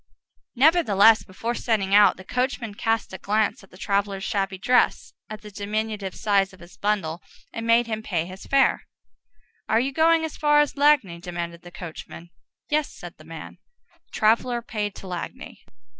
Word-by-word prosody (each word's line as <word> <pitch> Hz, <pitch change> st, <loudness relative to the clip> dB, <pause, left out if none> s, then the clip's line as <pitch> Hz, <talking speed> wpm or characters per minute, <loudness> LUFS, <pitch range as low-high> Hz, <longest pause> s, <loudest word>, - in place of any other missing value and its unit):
Nevertheless, 235 Hz, -, +5 dB
before 225 Hz, +5 st, -4 dB
setting 210 Hz, -5 st, -1 dB
out, 205 Hz, 0 st, +6 dB
the 185 Hz, -, -11 dB
coachman 250 Hz, 0 st, -2 dB
cast 225 Hz, -1 st, -1 dB
a 190 Hz, -, -7 dB
glance 210 Hz, 0 st, 0 dB
at 195 Hz, -, -18 dB
the 185 Hz, -, -16 dB
traveller's 200 Hz, 0 st, -1 dB
shabby 195 Hz, -3 st, -2 dB
dress, 250 Hz, +6 st, +1 dB, 0.2 s
at 215 Hz, 0 st, -8 dB
the 210 Hz, -, -10 dB
diminutive 210 Hz, -1 st, -3 dB
size 195 Hz, -2 st, +1 dB
of 190 Hz, -, -16 dB
his 175 Hz, +1 st, -15 dB
bundle, 185 Hz, -4 st, -1 dB, 0.3 s
and 230 Hz, 0 st, -5 dB
made 230 Hz, +1 st, +4 dB
him 220 Hz, -1 st, -4 dB
pay 175 Hz, -6 st, -2 dB
his 185 Hz, +2 st, -11 dB
fare. 275 Hz, -1 st, +2 dB, 0.8 s
"Are 220 Hz, -, +4 dB
you 265 Hz, +3 st, -1 dB
going 320 Hz, +2 st, +3 dB
as 320 Hz, -, -7 dB
far 295 Hz, -1 st, +4 dB
as 295 Hz, -1 st, +1 dB
Lagny?" 280 Hz, -, +3 dB
demanded 170 Hz, -1 st, -6 dB
the 175 Hz, -, -12 dB
coachman. 170 Hz, -1 st, -10 dB, 0.4 s
"Yes," 300 Hz, 0 st, 0 dB
said -, -, -11 dB
the -, -, -15 dB
man. -, -, -10 dB, 0.5 s
The -, -, -40 dB
traveller 235 Hz, +2 st, +1 dB
paid 210 Hz, -3 st, -4 dB
to 195 Hz, -, -10 dB
Lagny. 185 Hz, +9 st, -7 dB
210 Hz, 175 wpm, -24 LUFS, 190-240 Hz, 0.8 s, out